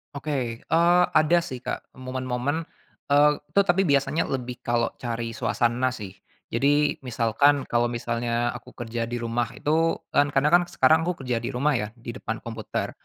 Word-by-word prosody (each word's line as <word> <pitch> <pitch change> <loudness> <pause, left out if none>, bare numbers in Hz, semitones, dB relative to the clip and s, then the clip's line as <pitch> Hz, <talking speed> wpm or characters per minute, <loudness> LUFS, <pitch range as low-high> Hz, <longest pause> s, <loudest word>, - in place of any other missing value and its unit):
Oke, 135 -6 -3
eee, 175 +2 +4 0.2
ada 165 +3 +4
sih 130 -7 -7
Kak - - -4
momen-momen, 130 +4 -3 0.4
eee, 145 +1 +5 0.2
itu 165 +7 +1
tapi 190 -1 +2
biasanya 140 +3 +2
lebih 125 -2 -4
kalau 120 -2 0
cari 115 -1 -3
suasana 120 +2 0
sih. 105 -7 -5 0.4
Jadi 145 +4 +2
misalkan, 130 +3 +2
kalau 120 0 +1
misalnya 120 0 -1
aku 125 -1 -11
kerja 115 -1 -4
di 120 - -4
rumah 120 0 -1
itu, 165 +2 +1 0.2
kan 145 0 +4
kadang 145 +3 +3
kan 175 0 +6
sekarang 160 +5 +3
aku 165 -6 -3
kerja 120 -2 -1
di 120 - -5
rumah 135 +1 +1
ya, 105 - -2
di 120 -1 -7
depan 115 -2 -5
komputer. 115 -2 -4
130 Hz, 165 wpm, -25 LUFS, 120-150 Hz, 0.4 s, kan